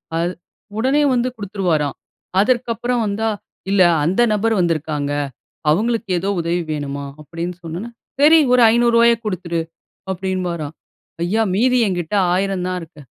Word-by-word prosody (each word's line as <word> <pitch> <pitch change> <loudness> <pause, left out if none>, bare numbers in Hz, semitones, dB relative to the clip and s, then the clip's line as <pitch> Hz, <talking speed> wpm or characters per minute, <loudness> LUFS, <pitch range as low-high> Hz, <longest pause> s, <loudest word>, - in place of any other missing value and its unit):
அது, 170 +2 0 0.5
உடனே 265 +6 +2
வந்து 245 0 +1
குடுத்துருவாராம். 185 - -1 0.4
அதற்கப்புறம் 240 +1 +1
வந்தா, 215 +2 -1 0.4
"இல்ல 200 -2 +4 0.2
அந்த 190 +8 +2
நபர் 220 +2 +1
வந்துருக்காங்க. 155 -4 -1 0.6
அவங்களுக்கு 225 +6 +1
ஏதோ 195 +3 -2
உதவி 170 +1 -1
வேணுமாம்" 140 -1 -4
அப்படின்னு 170 +3 -5
சொன்னோன, 175 +8 -6 0.3
"சரி 320 +2 +7
ஒரு 250 - +5
ரூ.500 235 0 +5
குடுத்துடு" 175 -4 -2 0.5
அப்படின்பாராம். 180 -5 -3 0.5
"ஐயா 220 +5 +1
மீதி 250 +3 +3
என்கிட்ட 175 +1 -2 0.2
1,000 190 -1 0
தான் 185 0 -2
இருக்கு". 160 -2 -12
190 Hz, 125 wpm, -19 LUFS, 165-230 Hz, 0.6 s, சரி